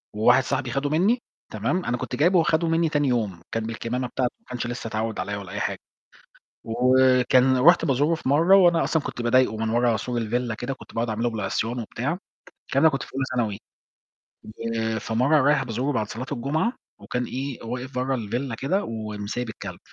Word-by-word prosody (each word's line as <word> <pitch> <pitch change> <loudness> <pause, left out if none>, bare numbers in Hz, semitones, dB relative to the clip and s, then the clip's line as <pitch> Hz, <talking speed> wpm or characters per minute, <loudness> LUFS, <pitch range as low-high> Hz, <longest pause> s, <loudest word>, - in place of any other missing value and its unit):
وواحد 120 +5 +5
صاحبي 130 -1 -2
خَدُه 140 +2 -1
مني، 200 +11 +2 0.3
تمام، 115 - -1
أنا 125 - 0
كنت - - -4
جايبه، 170 +3 +4
خَدُه 160 +1 +1
مني 165 0 +2
تاني 145 -1 +1
يوم، 110 -9 -1
كان 115 - -1
بالكمامة 115 +3 -3
بتاع 130 - -1
ما - - -38
كانش 125 -1 -4
لسة 120 -1 -5
اتعود 110 0 -3
عليَّ 100 0 -2
ولا 95 -3 -8
أي 105 - -4
حاجة. - - -2 0.9
وكان 130 +2 +4
رُحت 170 +6 +6
بازوره 145 +2 +2
في 160 - -5
مرّة، 165 +7 +5
وأنا 175 -3 +5
أصلًا 160 - +1
كنت 120 - -5
باضايقه 120 -2 +3
من 110 0 -1
ورا 120 0 +2
سور 120 +2 -3
الvilla 120 +1 -1
كده، 120 +5 -4
كنت - - -15
باقعد 115 +1 -1
أعمل 110 +1 -2
له 120 - +2
بالعصيان 110 +3 -2
وبتاع. 125 +9 -3 0.5
الكلام 135 +4 +2
ده 160 - +7
كنت 135 - -3
في - - -10
أولى 135 0 0
ثانوي. 110 -5 0 1.4
فمرّة 130 +9 +2
رايح 145 0 +3
بازوره 125 +4 -2
بعد 110 -4 -1
صلاة 125 +3 -5
الجمعة، 155 - 0 0.3
وكان 125 0 -3
إيه، 135 +1 -5
واقف 125 +3 -5
برّه 130 +1 0
الvilla 120 +3 -3
كده، 140 - 0
ومسيب 110 +1 -4
الكلب. 110 - -8
125 Hz, 190 wpm, -24 LUFS, 115-140 Hz, 1.4 s, ده